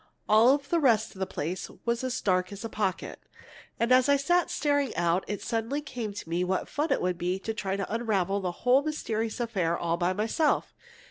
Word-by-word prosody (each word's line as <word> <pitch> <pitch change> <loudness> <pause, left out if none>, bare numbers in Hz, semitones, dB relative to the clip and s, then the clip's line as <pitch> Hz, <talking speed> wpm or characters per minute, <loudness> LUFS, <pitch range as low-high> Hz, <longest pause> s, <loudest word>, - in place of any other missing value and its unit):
All 230 +6 +6
the 290 +4 -1
rest 230 -7 +3
of 190 - -13
the 190 - -1
place 175 +5 -4 0.2
was 235 +1 0
as 255 -1 -1
dark 185 -1 +1
as 200 +2 -7
a - - -4
pocket. 200 -4 -2 0.6
And 235 +2 +1
as 255 +2 +5
I 285 - +6
sat 350 +5 +2
staring 285 -3 0
out, 175 +2 +1
it 205 -1 -4
suddenly 230 +5 -1
came 250 -7 -5
to 200 - -8
me 170 +2 0
what 185 +1 -1
fun 300 +3 -2
it - - +1
would 180 -1 -1
be 180 +1 0
to 220 +3 -4
try 195 -3 -2
to 200 +1 -4
unravel 200 -4 0
the 180 -2 -1
whole 255 +2 +6
mysterious 230 -7 -3
affair 190 -8 0
all 170 0 -1
by 175 +1 +1
myself. 225 - 0
220 Hz, 210 wpm, -28 LUFS, 185-255 Hz, 0.6 s, All